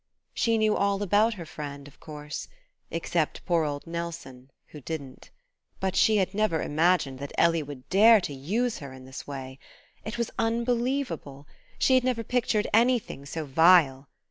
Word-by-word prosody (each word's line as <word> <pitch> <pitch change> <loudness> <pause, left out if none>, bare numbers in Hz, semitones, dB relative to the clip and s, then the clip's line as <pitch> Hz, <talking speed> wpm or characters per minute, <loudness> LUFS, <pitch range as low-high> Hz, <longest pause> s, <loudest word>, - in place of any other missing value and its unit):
She 230 -1 +1
knew 215 -1 +2
all 200 0 0
about 210 +3 +3
her 175 -4 -8
friend, 145 -2 -8
of 145 - -18
course; 150 -1 -7 0.4
except - - -2
poor 170 -3 +2
old 145 -1 -4
Nelson, 165 -6 -7 0.2
who 150 - -11
didn't, 140 -2 -7 0.5
But 190 -1 -1
she 215 -1 +4
had 190 -1 0
never 210 -6 +1
imagined 155 -4 +1
that 140 0 -6
Ellie 165 -1 +3
would 140 -3 -9
dare 220 +4 +7
to 150 - -5
use 215 - -2
her 140 -2 -9
in 130 -1 -12
this 130 0 -9
way. 135 -1 -7 0.4
It 220 +2 -5
was 235 -1 -2
unbelievable... 235 - -1 0.3
she 260 - +3
had 255 -1 +4
never 250 -3 0
pictured 225 -3 0
anything 230 - +1
so 160 +1 -4
vile.... 145 -2 +4
170 Hz, 165 wpm, -27 LUFS, 140-220 Hz, 0.5 s, dare